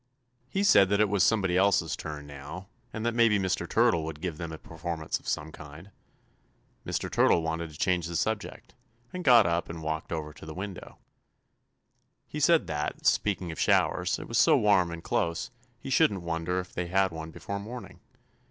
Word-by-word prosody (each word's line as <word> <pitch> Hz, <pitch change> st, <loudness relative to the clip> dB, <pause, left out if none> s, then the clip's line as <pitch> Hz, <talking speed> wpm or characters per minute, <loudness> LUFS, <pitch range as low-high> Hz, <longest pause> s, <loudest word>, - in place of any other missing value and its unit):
He 195 Hz, +8 st, -1 dB
said 100 Hz, -, +6 dB
that 100 Hz, 0 st, +2 dB
it 105 Hz, -1 st, +3 dB
was 100 Hz, -1 st, +1 dB
somebody 100 Hz, -4 st, +2 dB
else's 95 Hz, -4 st, +2 dB
turn 75 Hz, -2 st, -7 dB
now, 70 Hz, +6 st, -9 dB, 0.3 s
and 110 Hz, +1 st, -5 dB
that 120 Hz, -, +1 dB
maybe 115 Hz, -3 st, +4 dB
Mr. 95 Hz, -2 st, -1 dB
Turtle 85 Hz, -2 st, +3 dB
would 80 Hz, -1 st, -6 dB
give 80 Hz, -2 st, -4 dB
them 85 Hz, -2 st, -5 dB
a 80 Hz, -, -6 dB
performance 80 Hz, 0 st, -4 dB
of -, -, -17 dB
some 75 Hz, +1 st, -2 dB
kind. 75 Hz, +7 st, -12 dB, 0.9 s
Mr. -, -, -2 dB
Turtle 85 Hz, -, +3 dB
wanted 80 Hz, 0 st, -3 dB
to 75 Hz, -, -13 dB
change 90 Hz, 0 st, +1 dB
the 85 Hz, -, -5 dB
subject, 105 Hz, +5 st, -3 dB, 0.4 s
and 180 Hz, 0 st, -5 dB
got 120 Hz, -, +7 dB
up 85 Hz, 0 st, 0 dB
and 85 Hz, -1 st, -7 dB
walked 80 Hz, 0 st, -3 dB
over 75 Hz, -2 st, -4 dB
to 75 Hz, -, -13 dB
the 80 Hz, -, -7 dB
window. 95 Hz, 0 st, -7 dB, 1.3 s
He 150 Hz, -, -6 dB
said 165 Hz, +2 st, +4 dB
that, 75 Hz, 0 st, -4 dB
speaking 95 Hz, -4 st, +1 dB
of 80 Hz, -, -8 dB
showers, -, -, +2 dB
it -, -, -8 dB
was -, -, 0 dB
so -, -, +6 dB
warm 100 Hz, -4 st, +3 dB
and 85 Hz, 0 st, -7 dB
close, 85 Hz, +9 st, -1 dB, 0.3 s
he 135 Hz, -, -7 dB
shouldn't 105 Hz, -, +3 dB
wonder 85 Hz, +2 st, -2 dB
if 90 Hz, 0 st, -7 dB
they 90 Hz, 0 st, -3 dB
had 95 Hz, +1 st, +2 dB
one 80 Hz, -1 st, -7 dB
before 100 Hz, +5 st, -6 dB
morning. 105 Hz, -2 st, -9 dB
90 Hz, 190 wpm, -28 LUFS, 80-100 Hz, 1.3 s, got